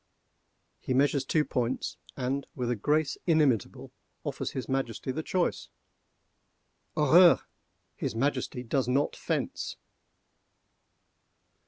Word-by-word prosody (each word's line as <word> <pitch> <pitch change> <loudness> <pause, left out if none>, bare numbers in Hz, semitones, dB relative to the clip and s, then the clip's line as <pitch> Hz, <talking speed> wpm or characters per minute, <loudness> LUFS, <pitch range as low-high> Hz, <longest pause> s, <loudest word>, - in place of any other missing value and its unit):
He 130 - -2
measures 140 0 +2
two 150 +2 +2
points, 125 -1 -2 0.2
and, 135 +1 -2
with 125 -1 -1
a - - +1
grace 150 +7 +1
inimitable, 150 - +2 0.3
offers - - -3
his 130 - -5
Majesty 130 -2 -2
the 155 - -3
choice. 180 +2 -1 1.3
Horreur! 165 +4 +7 0.5
his - - -3
Majesty 130 0 -1
does 125 +1 0
not 135 +3 +1
fence! - - -3
135 Hz, 105 wpm, -29 LUFS, 125-150 Hz, 1.3 s, Horreur